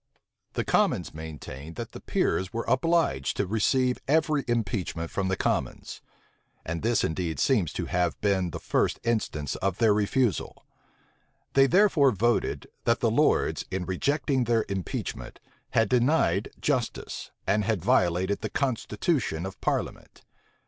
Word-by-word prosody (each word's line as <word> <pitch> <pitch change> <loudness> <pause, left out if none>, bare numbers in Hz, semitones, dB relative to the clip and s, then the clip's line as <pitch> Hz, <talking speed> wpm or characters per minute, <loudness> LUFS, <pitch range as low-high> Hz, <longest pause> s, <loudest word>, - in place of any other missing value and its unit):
The - - -1
commons - - +1
maintained 80 -1 -8
that - - -6
the - - -9
peers 95 0 0
were 115 0 -3
obliged 140 - +1
to 100 - +1
receive 125 +5 +1
every 150 -1 +2
impeachment 100 -8 -2
from 95 -1 -1
the 95 - +1
commons; - - -2 0.6
and 85 0 -3
this 115 +1 +2
indeed 80 -2 -2
seems 105 - +2
to - - -3
have 90 -1 0
been 95 -3 +1
the 80 - -5
first - - 0
instance 105 - -1
of 95 -2 -1
their 110 -3 +4
refusal: 105 +2 0 0.9
they 135 0 +6
therefore 175 -5 +5
voted, 120 +1 0 0.2
that - - +3
the - - +2
lords, - - +2
in 95 -1 -3
rejecting 135 - 0
their 115 -1 +2
impeachment, 95 -3 -4 0.3
had 110 -1 +2
denied 120 - +2
justice, 130 -6 -2 0.2
and 105 0 +1
had 100 -5 -1
violated 95 -4 +2
the 110 - -3
constitution 120 - -1
of 95 - -8
parliament. - - -3
105 Hz, 140 wpm, -27 LUFS, 90-130 Hz, 0.9 s, they